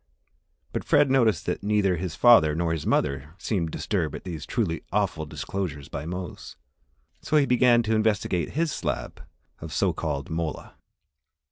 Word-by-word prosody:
But - - -2
Fred 145 -2 +3
noticed 120 -6 +3
that - - -2
neither 100 -2 +2
his 85 -1 -4
father 80 -11 +6
or 80 -1 0
mother 70 +4 0
seemed 95 -6 -1
disturbed - - -2
at - - -8
these 80 -6 -6
truly 95 -10 -1
awful 80 -1 0
disclosures 75 -4 -5
by 70 +3 -5
Mose, 90 +1 -6 0.7
so 155 - +1
he 145 - +4
began 125 -2 +4
to 110 0 0
investigate 105 -6 0
his 160 +1 0
slab - - -4 0.4
of - - -8
so - - +1
called 70 +1 -4
mola. 80 -1 -4
95 Hz, 150 wpm, -26 LUFS, 80-115 Hz, 0.7 s, father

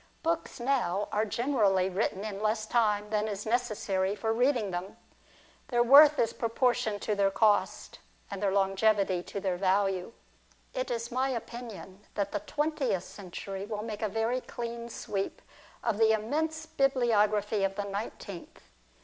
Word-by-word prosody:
Books 330 -3 -1
now 240 -6 0
are 215 +1 +1
generally 210 -6 +2
written 190 +1 -1
in 205 -2 -5
less 215 0 0
time 210 -2 +1
than 215 0 +1
is 205 -1 -4
necessary 210 -5 0
for 220 +1 -1
reading 240 -4 +1
them. 180 +2 -5 0.7
Their 240 -1 +2
worth 290 +4 +8
is 230 - +1
proportioned 230 -2 0
to 215 - 0
their 200 -1 +3
cost, 205 +1 +1 0.3
and 200 - -5
their 200 -2 +2
longevity 195 -1 +2
to 200 - -6
their 190 -2 -1
value. 195 +1 +1 0.6
It 255 - -2
is 235 0 -3
my 260 +2 +1
opinion 230 -5 -6 0.2
that 200 -1 -1
the - - -1
twentieth 290 - -1
century 195 +1 -7
will 210 -1 -4
make 220 -2 -6
a 215 - 0
very 225 +4 0
clean 235 -1 -6
sweep 195 -3 -4 0.4
of 225 -3 0
the 220 -1 +5
immense 315 +9 -1
bibliography 225 -8 +2
of 195 0 0
the 205 - -2
nineteenth. 200 -2 -6
215 Hz, 150 wpm, -29 LUFS, 200-240 Hz, 0.7 s, worth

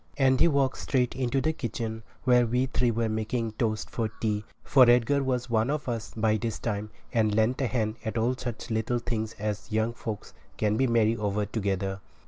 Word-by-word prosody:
And 130 -2 +4
he 170 - +6
walked 140 -4 +1
straight 125 -3 0
into 130 +1 0
the 160 +2 +1
kitchen 115 -5 -4 0.2
where 125 -1 +4
we 125 +3 +1
three 125 -2 +1
were 115 0 0
making 110 +1 -1
toast 110 -1 -1
for 115 -6 -2
tea, 105 -1 -2 0.2
for 130 -3 +6
Edgar 125 +4 +4
was 130 -2 -1
one 115 0 +1
of 150 -1 -2
us 115 -3 -3
by 110 0 +2
this 115 0 -3
time, 105 -2 -3 0.2
and 110 -3 +2
lent 110 +5 +2
a 130 - +2
hand 110 -2 -1
at 110 +1 -3
all 120 +3 +1
such 120 -2 -6
little 110 +2 0
things 115 -2 -3
as 105 +1 -4
young 110 +2 +1
folks 110 -3 -6 0.2
can 105 -1 +1
be 130 +4 +2
merry 115 -1 +3
over 105 -1 -1
together. 100 -2 -2
115 Hz, 200 wpm, -28 LUFS, 110-125 Hz, 0.2 s, he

